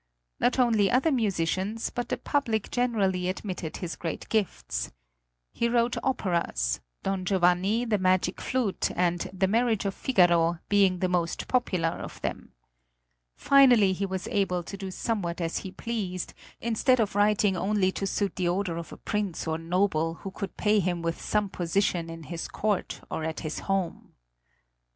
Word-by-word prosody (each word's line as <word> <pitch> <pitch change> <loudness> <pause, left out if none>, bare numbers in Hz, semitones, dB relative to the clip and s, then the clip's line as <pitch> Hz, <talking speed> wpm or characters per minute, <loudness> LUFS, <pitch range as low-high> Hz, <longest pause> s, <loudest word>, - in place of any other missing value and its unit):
Not 250 - +2
only 225 -6 +4
other 265 +6 +3
musicians, 205 - 0
but 245 -1 -4
the - - 0
public 230 -8 -1
generally 195 -7 +1
admitted 185 -4 -4
his 175 -2 -4
great 165 -3 -5
gifts. - - -1 0.6
He 235 - 0
wrote 235 0 +2
operas, 170 - 0 0.2
"Don 195 -1 -1
Giovanni," 190 +5 +2
"The 215 -3 +1
Magic 185 0 +1
Flute," 245 -7 0
and 175 -1 0
"The 190 0 +1
Marriage 225 0 +1
of 195 - 0
Figaro," 175 -8 +3
being 195 -3 +4
the 185 - 0
most 175 -2 -1
popular 185 -10 +1
of - - -7
them. - - -4 0.8
Finally 245 -8 +6
he 195 +2 -2
was 190 -1 -4
able 180 -3 0
to 200 - -7
do 195 -1 -6
somewhat 185 -3 -2
as 165 -1 -1
he 190 - -7
pleased, 190 -3 -4 0.3
instead 235 +3 +2
of 215 -2 +1
writing 205 -1 +3
only 190 +1 +1
to 195 - -3
suit 200 -1 -1
the 180 -2 +1
order 180 -2 -1
of 170 - -6
a - - -9
prince 205 -5 -2
or 160 0 -1
noble 165 -1 +1
who 195 +4 -7
could 195 0 -6
pay 210 0 +3
him 175 -2 -1
with 165 0 -2
some 210 -1 +1
position 175 -2 0
in 165 0 -8
his 165 +1 -5
court 210 -2 -2
or 160 - -2
at 160 0 -3
his 155 -1 -4
home. 195 -3 -2
190 Hz, 165 wpm, -27 LUFS, 175-215 Hz, 0.8 s, Finally